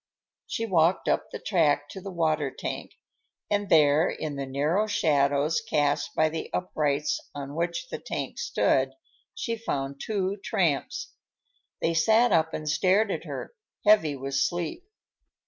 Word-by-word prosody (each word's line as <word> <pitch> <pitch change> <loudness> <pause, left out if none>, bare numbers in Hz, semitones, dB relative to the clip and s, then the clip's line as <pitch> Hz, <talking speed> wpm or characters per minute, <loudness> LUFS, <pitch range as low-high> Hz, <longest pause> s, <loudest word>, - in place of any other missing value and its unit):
She 230 - -2
walked 175 -3 +2
up - - +1
the - - -6
track 150 -6 +1
to 190 - -8
the 195 - -6
water 155 -5 0
tank, - - -6 0.6
and 205 -1 0
there, 155 -1 +5
in 150 -2 -4
the 140 -1 -4
narrow 150 +10 +1
shadows 145 -4 +2
cast 145 0 0
by 155 - +4
the 160 0 -5
uprights 170 - 0 0.2
on 140 0 -6
which 170 - -2
the - - -5
tank - - -5
stood, - - +1 0.4
she 230 - -2
found 140 -11 -4
two 200 -2 -1
tramps. 160 -7 -1 0.7
They 165 - +1
sat 220 +8 +4
up 160 0 +3
and 155 - -5
stared 190 +7 +3
at - - -4
her, - - -6 0.3
heavy 185 -9 +5
with 135 +1 -5
sleep. 175 - -1
160 Hz, 145 wpm, -27 LUFS, 145-195 Hz, 0.7 s, there